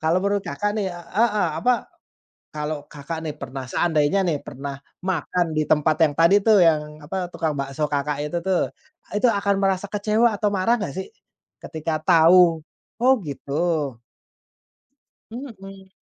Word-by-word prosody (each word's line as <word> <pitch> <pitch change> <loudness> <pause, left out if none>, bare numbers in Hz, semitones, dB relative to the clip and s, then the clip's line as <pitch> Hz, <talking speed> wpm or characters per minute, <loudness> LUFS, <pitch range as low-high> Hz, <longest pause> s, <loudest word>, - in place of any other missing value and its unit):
kalau 160 +3 +2
menurut 200 0 +1
Kakak 205 0 -2
nih, 200 -3 0
eee, 180 +7 0
heeh, 205 -5 0
apa, 245 +4 +1 0.7
kalau 150 -1 -4
Kakak 155 +3 -6
nih 150 - -3
pernah 130 0 -6
seandainya 160 +4 +2
nih 160 -4 +1
pernah 140 +1 -6 0.3
makan 175 -2 -1
di 155 - +2
tempat 155 +1 +3
yang 145 - -1
tadi 170 +5 +6
tuh 215 -2 +6
yang 150 -1 +1
apa 180 +4 -4
tukang 155 -2 -1
bakso 140 +2 -2
Kakak 145 0 -1
itu 160 +3 -3
tuh. 190 -2 +1 0.4
Itu 210 +4 +1
akan 200 -2 +1
merasa 195 0 +1
kecewa 215 +2 +2
atau 210 -1 +1
marah 195 +5 +2
enggak 200 -10 -4
sih, 190 - -4 0.5
ketika 160 0 -3
tahu? 170 0 +5 0.4
Oh 260 +2 +6
gitu. 145 -1 -2 1.3
Mmm. 195 -6 -10
170 Hz, 150 wpm, -23 LUFS, 150-200 Hz, 1.3 s, tadi